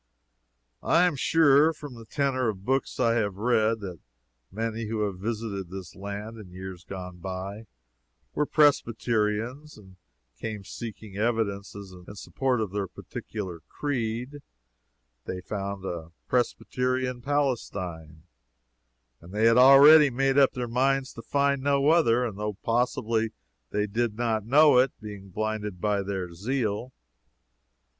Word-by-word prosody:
I 170 Hz, +2 st, +4 dB
am 180 Hz, -4 st, +2 dB
sure, 150 Hz, +2 st, +4 dB
from 145 Hz, -3 st, -9 dB
the 115 Hz, -1 st, -11 dB
tenor 130 Hz, -1 st, 0 dB
of 100 Hz, -2 st, -6 dB
books 135 Hz, +1 st, -1 dB
I 115 Hz, -2 st, +3 dB
have 100 Hz, -4 st, 0 dB
read, 110 Hz, 0 st, +1 dB
that 90 Hz, -5 st, -7 dB, 0.5 s
many 115 Hz, +2 st, -3 dB
who 110 Hz, 0 st, -2 dB
have 100 Hz, -3 st, -2 dB
visited 105 Hz, -3 st, -4 dB
this 95 Hz, -2 st, -8 dB
land 100 Hz, +3 st, -6 dB
in 100 Hz, -4 st, -11 dB
years 95 Hz, -1 st, -8 dB
gone 90 Hz, -1 st, -8 dB
by, 95 Hz, +4 st, -6 dB, 0.7 s
were 150 Hz, -, 0 dB
Presbyterians, 120 Hz, -1 st, +1 dB
and 95 Hz, -3 st, -16 dB, 0.4 s
came 110 Hz, -3 st, -5 dB
seeking 105 Hz, 0 st, -8 dB
evidences 100 Hz, -3 st, -2 dB
in 90 Hz, +2 st, -12 dB
support 125 Hz, +7 st, -1 dB
of 105 Hz, -4 st, -3 dB
their 100 Hz, -1 st, -2 dB
particular 95 Hz, -2 st, -7 dB
creed; 125 Hz, 0 st, -3 dB, 0.9 s
they 90 Hz, -, -4 dB
found 100 Hz, 0 st, -5 dB
a 85 Hz, -3 st, -5 dB, 0.2 s
Presbyterian 125 Hz, 0 st, -1 dB
Palestine, 95 Hz, -, -2 dB, 1.0 s
and 85 Hz, -, -14 dB
they 105 Hz, +2 st, +1 dB
had 115 Hz, +1 st, +5 dB
already 140 Hz, +3 st, +9 dB
made 135 Hz, +1 st, +1 dB
up 140 Hz, -1 st, +5 dB
their 125 Hz, -1 st, -3 dB
minds 130 Hz, +2 st, +1 dB
to 115 Hz, -, -9 dB
find 140 Hz, +2 st, +1 dB
no 140 Hz, +1 st, +2 dB
other, 125 Hz, -8 st, +3 dB
though 105 Hz, +1 st, -4 dB
possibly 115 Hz, -2 st, 0 dB, 0.4 s
they 105 Hz, 0 st, 0 dB
did 110 Hz, +1 st, -1 dB
not 110 Hz, -3 st, -1 dB
know 145 Hz, 0 st, +6 dB
it, 130 Hz, +1 st, +1 dB
being 100 Hz, -2 st, -9 dB
blinded 105 Hz, -1 st, -3 dB
by 105 Hz, +1 st, +1 dB
their 95 Hz, -3 st, -4 dB
zeal. 115 Hz, +4 st, -2 dB
110 Hz, 135 wpm, -27 LUFS, 100-130 Hz, 1.0 s, already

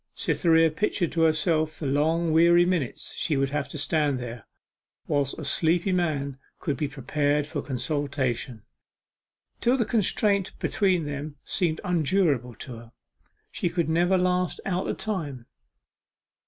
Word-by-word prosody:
Cytherea 165 Hz, -2 st, +3 dB
pictured 175 Hz, 0 st, -1 dB
to 165 Hz, -, 0 dB
herself 155 Hz, 0 st, +2 dB
the 155 Hz, -, -5 dB
long 160 Hz, +4 st, +1 dB
weary 170 Hz, +2 st, +6 dB
minutes 175 Hz, -9 st, -2 dB
she 150 Hz, -4 st, 0 dB
would 135 Hz, 0 st, 0 dB
have 145 Hz, -1 st, -2 dB
to -, -, -6 dB
stand 145 Hz, -1 st, +1 dB
there, 120 Hz, -2 st, -7 dB, 0.6 s
whilst 140 Hz, -2 st, 0 dB
a 155 Hz, -, -6 dB
sleepy 170 Hz, +6 st, +2 dB
man 145 Hz, -7 st, -1 dB, 0.2 s
could 145 Hz, -5 st, -2 dB
be 145 Hz, +3 st, -2 dB
prepared 145 Hz, +2 st, 0 dB
for 155 Hz, -, -4 dB
consultation, 130 Hz, -4 st, -2 dB, 1.0 s
till 245 Hz, +3 st, +2 dB
the 235 Hz, -, +1 dB
constraint 205 Hz, -3 st, +1 dB
between 185 Hz, -6 st, +1 dB
them 145 Hz, +1 st, -5 dB
seemed 165 Hz, -4 st, 0 dB
unendurable 155 Hz, -, +1 dB
to 125 Hz, -4 st, -8 dB
her 115 Hz, 0 st, -14 dB, 0.6 s
she 175 Hz, -, -1 dB
could 170 Hz, -2 st, -1 dB
never 175 Hz, +3 st, +3 dB
last 180 Hz, 0 st, 0 dB
out 185 Hz, -1 st, -1 dB
the -, -, -1 dB
time. 150 Hz, -, -4 dB
155 Hz, 140 wpm, -26 LUFS, 140-175 Hz, 1.0 s, weary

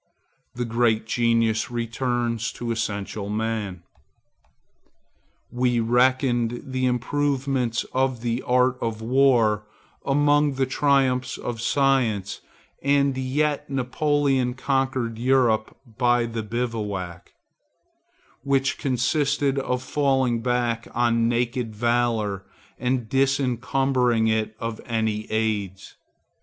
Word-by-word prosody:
The 120 Hz, 0 st, -2 dB
great 115 Hz, -1 st, +1 dB
genius 115 Hz, -1 st, +1 dB
returns 120 Hz, -1 st, -2 dB
to 120 Hz, -1 st, -4 dB
essential 105 Hz, -2 st, -3 dB
man. 105 Hz, -4 st, -3 dB, 1.7 s
We 125 Hz, -1 st, +1 dB
reckoned 120 Hz, 0 st, +2 dB
the 130 Hz, -1 st, -1 dB
improvements 130 Hz, -1 st, 0 dB
of 130 Hz, -2 st, 0 dB
the 120 Hz, +1 st, -1 dB
art 125 Hz, 0 st, +2 dB
of 110 Hz, -1 st, -3 dB
war 115 Hz, -4 st, +3 dB, 0.4 s
among 145 Hz, +1 st, +3 dB
the 135 Hz, 0 st, 0 dB
triumphs 130 Hz, -2 st, +1 dB
of 115 Hz, -2 st, -5 dB
science, 120 Hz, -8 st, +1 dB, 0.4 s
and 140 Hz, -1 st, +2 dB
yet 140 Hz, +3 st, -1 dB
Napoleon 135 Hz, -1 st, 0 dB
conquered 130 Hz, -4 st, -1 dB
Europe 120 Hz, -4 st, +2 dB, 0.2 s
by 120 Hz, -1 st, +3 dB
the 115 Hz, -1 st, -4 dB
bivouac, 105 Hz, -6 st, -4 dB, 1.1 s
which 135 Hz, -1 st, +1 dB
consisted 140 Hz, +1 st, +1 dB
of 125 Hz, -1 st, -2 dB
falling 130 Hz, -4 st, +1 dB
back 120 Hz, -1 st, -1 dB
on 115 Hz, -1 st, +2 dB
naked 120 Hz, -1 st, -1 dB
valor 115 Hz, -4 st, 0 dB, 0.4 s
and 125 Hz, -2 st, -1 dB
disencumbering 130 Hz, -2 st, +1 dB
it 110 Hz, 0 st, -1 dB
of 115 Hz, -1 st, -4 dB
all -, -, -15 dB, 0.4 s
aids. 105 Hz, -4 st, -2 dB
120 Hz, 100 wpm, -24 LUFS, 115-135 Hz, 1.7 s, war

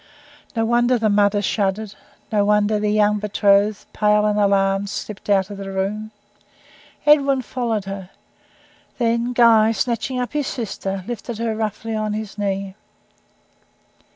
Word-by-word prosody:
No 225 Hz, -1 st, +1 dB
wonder 240 Hz, +2 st, +2 dB
the 220 Hz, -2 st, +1 dB
mother 205 Hz, 0 st, +2 dB
shuddered 200 Hz, +1 st, -1 dB, 0.4 s
no 210 Hz, -2 st, +2 dB
wonder 210 Hz, +1 st, +2 dB
the 210 Hz, 0 st, 0 dB
young 210 Hz, 0 st, +2 dB
betrothed, 205 Hz, 0 st, +2 dB
pale 210 Hz, 0 st, +3 dB
and 210 Hz, 0 st, +1 dB
alarmed, 195 Hz, 0 st, +2 dB
slipped 210 Hz, 0 st, -7 dB
out 195 Hz, 0 st, +2 dB
of 200 Hz, -, -7 dB
the 195 Hz, -1 st, -6 dB
room. 200 Hz, +3 st, -3 dB, 1.0 s
Edwin 275 Hz, -3 st, +4 dB
followed 230 Hz, -4 st, -2 dB
her. 195 Hz, -1 st, -7 dB, 0.9 s
Then 235 Hz, 0 st, 0 dB
Guy, 230 Hz, -2 st, +5 dB
snatching 245 Hz, +2 st, -2 dB
up 245 Hz, +2 st, -3 dB
his 295 Hz, -2 st, -1 dB
sister, 195 Hz, -4 st, -4 dB
lifted 235 Hz, -1 st, -5 dB
her 225 Hz, -1 st, -2 dB
roughly 220 Hz, +1 st, -3 dB
on 215 Hz, -1 st, -2 dB
his 215 Hz, -1 st, -5 dB
knee. 195 Hz, -1 st, -3 dB
210 Hz, 140 wpm, -21 LUFS, 200-230 Hz, 1.0 s, Guy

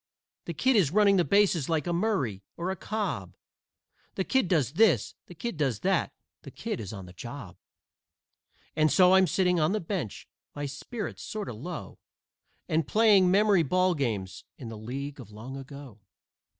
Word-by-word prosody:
"The -, -, -5 dB
Kid 260 Hz, -1 st, +2 dB
is 190 Hz, -10 st, +4 dB
running 200 Hz, +2 st, +4 dB
bases 180 Hz, -4 st, +3 dB
like 160 Hz, -3 st, 0 dB
a 175 Hz, -, -1 dB
Murray 170 Hz, -, 0 dB, 0.2 s
or 175 Hz, +2 st, -2 dB
a -, -, -3 dB
Cobb, 165 Hz, -, -4 dB, 0.8 s
The 190 Hz, -, 0 dB
Kid 265 Hz, 0 st, +1 dB
does 150 Hz, -, +1 dB
this, 170 Hz, -, +3 dB
the 175 Hz, -, -12 dB
Kid 235 Hz, +1 st, -5 dB
does 135 Hz, -8 st, 0 dB
that, -, -, +1 dB, 0.3 s
the -, -, -10 dB
Kid -, -, -5 dB
is 105 Hz, -4 st, -6 dB
on 100 Hz, -4 st, -8 dB
the 90 Hz, -, -13 dB
job." 120 Hz, -2 st, -8 dB, 1.2 s
And 155 Hz, 0 st, +3 dB
so 185 Hz, -1 st, +6 dB
I'm 190 Hz, -1 st, +6 dB
sitting 180 Hz, -2 st, +2 dB
on 155 Hz, +5 st, +2 dB
the 215 Hz, -, 0 dB
bench, 170 Hz, -, -4 dB, 0.3 s
my 145 Hz, 0 st, -3 dB
spirits 195 Hz, -, -6 dB
sort 215 Hz, -2 st, -5 dB
o' -, -, -5 dB
low, 155 Hz, +10 st, -7 dB, 0.7 s
And 155 Hz, -2 st, 0 dB
playing 210 Hz, -4 st, +5 dB
memory 200 Hz, -1 st, +4 dB
ball 185 Hz, +4 st, +2 dB
games 110 Hz, -, -3 dB
in 120 Hz, -, -8 dB
the 115 Hz, -, -7 dB
League 135 Hz, +6 st, -6 dB
of 120 Hz, -5 st, -10 dB
Long 110 Hz, +6 st, -9 dB
Ago. 135 Hz, -4 st, -10 dB
160 Hz, 175 wpm, -28 LUFS, 125-190 Hz, 1.2 s, so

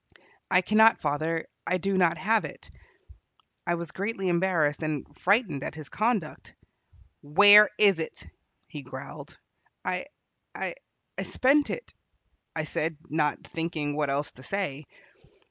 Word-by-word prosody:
"I 185 Hz, -1 st, +4 dB
cannot, 220 Hz, +4 st, +5 dB
father. 160 Hz, +3 st, -1 dB, 0.2 s
I 180 Hz, -, +2 dB
do 195 Hz, +2 st, -1 dB
not 175 Hz, -3 st, +3 dB
have 220 Hz, +3 st, +2 dB
it." -, -, -9 dB, 1.0 s
I 175 Hz, -, +2 dB
was 170 Hz, -3 st, -6 dB
greatly 195 Hz, 0 st, -2 dB
embarrassed 170 Hz, -4 st, +1 dB
and 155 Hz, -3 st, -2 dB
frightened 195 Hz, -, +1 dB
at -, -, -5 dB
his 155 Hz, -3 st, -9 dB
conduct. 215 Hz, -7 st, -2 dB, 0.7 s
"Where 205 Hz, +7 st, +8 dB
is 200 Hz, -5 st, +5 dB
it?" 160 Hz, -, -5 dB, 0.4 s
he -, -, -9 dB
growled. -, -, -10 dB, 0.5 s
"I -, -, -2 dB, 0.5 s
I -, -, -3 dB, 0.5 s
spent 280 Hz, +3 st, +2 dB
it," 485 Hz, -, -6 dB, 0.6 s
I 160 Hz, -, -1 dB
said, 155 Hz, 0 st, -2 dB
not 150 Hz, -1 st, 0 dB
thinking 160 Hz, -3 st, -3 dB
what 150 Hz, -2 st, 0 dB
else 140 Hz, +2 st, -1 dB
to 130 Hz, -, -16 dB
say. 150 Hz, -2 st, -3 dB
170 Hz, 130 wpm, -27 LUFS, 150-200 Hz, 1.0 s, Where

